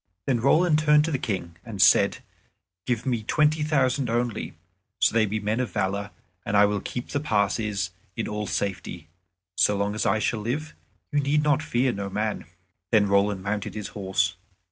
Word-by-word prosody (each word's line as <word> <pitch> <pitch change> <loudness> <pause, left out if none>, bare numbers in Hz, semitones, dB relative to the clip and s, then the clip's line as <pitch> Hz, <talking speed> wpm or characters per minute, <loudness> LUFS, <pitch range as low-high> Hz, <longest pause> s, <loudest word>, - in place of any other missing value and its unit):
Then 125 -3 +1
Roland 155 +5 +4
turned 150 -1 +4
to 165 - -2
the 135 - -1
King 90 -8 -4
and 110 -4 -8
said, - - +4 0.6
"Give 120 0 -1
me 120 -4 0
twenty 150 +7 +2
thousand 135 -4 +1
only, 120 -4 -2 0.4
so - - +3
they 110 -1 +3
be 110 +2 -2
men 105 +3 -1
of 125 - -1
valor, 100 +2 -1 0.3
and 105 - 0
I 105 - +7
will 105 0 0
keep 125 - -5
the 145 - -1
passes 105 -6 0 0.2
in 115 - -3
all 105 -1 -3
safety. 90 -5 -4 0.5
So 105 - +3
long 100 +1 -1
as 110 - -1
I 95 - +3
shall 110 +1 -1
live, 140 +9 -3 0.4
you 145 - +2
need 145 +2 +1 0.2
fear 125 -3 +1
no 100 -2 -4
man." 105 +2 -2 0.4
Then 105 -3 +3
Roland 100 -1 +2
mounted 105 +2 -3
his 105 -2 -5
horse. 95 -2 -1
110 Hz, 180 wpm, -25 LUFS, 100-130 Hz, 0.6 s, I